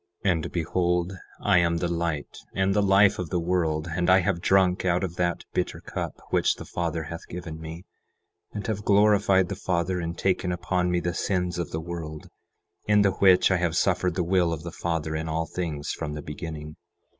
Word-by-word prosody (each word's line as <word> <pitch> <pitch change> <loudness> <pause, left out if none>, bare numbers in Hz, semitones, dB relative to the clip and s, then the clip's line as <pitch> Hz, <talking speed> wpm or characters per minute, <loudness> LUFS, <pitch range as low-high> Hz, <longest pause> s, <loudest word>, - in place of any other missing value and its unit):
11:11 95 - +5
And 80 -3 -2
behold, 90 +1 0 0.3
I 100 -3 +4
am 85 -1 +2
the 85 - -1
light 85 -3 -3 0.2
and 95 0 +2
the 105 - +3
life 100 0 +5
of 90 -3 -3
the 90 - 0
world; 85 -2 0
and 90 +1 +1
I 95 +1 +6
have 90 -2 -1
drunk 95 -1 +3
out 90 0 +1
of 90 -2 -3
that 85 -1 0
bitter - - -1
cup - - -5
which - - +3
the - - -9
Father 85 -1 -2
hath 85 +2 -8
given 80 -2 -7
me, 80 +2 -7 0.7
and 105 -2 -5
have 105 -2 -2
glorified 100 -2 +4
the 100 - -3
Father 90 -1 -1
in 85 0 -3
taking 90 0 0
upon 90 0 0
me 90 0 +1
the 90 0 -1
sins 90 -2 -1
of 85 - -2
the 80 - -3
world, 80 -2 -7 0.6
in 105 -1 +5
the 100 - +4
which 95 -1 +5
I 95 - +4
have 85 -1 0
suffered 90 -2 +1
the 90 - +1
will 90 -1 +2
of 80 -1 -4
the 85 - -6
Father 80 -2 -2
in 80 +1 -3
all 80 +1 -1
things 80 -5 -4
from 75 -2 -4
the 75 -1 -6
beginning. 75 0 -7
90 Hz, 205 wpm, -26 LUFS, 80-95 Hz, 0.7 s, I